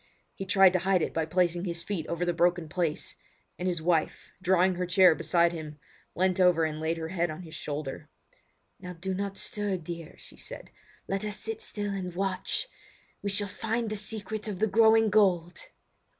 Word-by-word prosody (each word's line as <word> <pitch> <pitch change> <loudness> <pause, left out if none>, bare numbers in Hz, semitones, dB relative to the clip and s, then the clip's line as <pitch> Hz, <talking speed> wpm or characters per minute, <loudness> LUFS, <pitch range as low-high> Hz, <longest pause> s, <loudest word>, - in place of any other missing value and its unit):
He 195 - -7
tried 190 -2 +6
to 185 - +2
hide 185 -1 +2
it - - -2
by 160 -1 -1
placing 175 +1 +1
his 170 -2 -2
feet 180 -6 -3
over 170 +1 -1
the 175 - +1
broken 175 0 +2
place; 165 -1 -2 0.4
and 180 - -2
his 175 -3 -1
wife, 165 -2 0
drawing 185 0 +3
her 180 0 -2
chair 180 -1 +6
beside 170 +1 +2
him, 155 -2 -7 0.4
leant 185 +1 +1
over 180 -3 +5
and 155 -1 -3
laid 160 +1 -1
her 160 0 -4
head 175 -1 0
on 155 +4 -7
his 160 -2 -11
shoulder. 150 0 -5 0.7
"Now 180 -1 -7
do 185 +3 -4
not 195 +1 -3
stir, 205 -2 -2
dear," 170 -1 -8
she - - -12
said; - - -9 0.4
"let 195 +1 -2
us 210 -1 -3
sit 445 - -4
still 205 - -3
and 180 -3 -5
watch. 195 - 0 0.5
We 200 - -2
shall 200 +1 +1
find 225 +3 -2
the - - -1
secret 215 +1 -4
of 205 -3 -3
the 215 - +2
growing 220 +1 +5
gold!" 185 - +2
180 Hz, 195 wpm, -28 LUFS, 170-200 Hz, 0.7 s, tried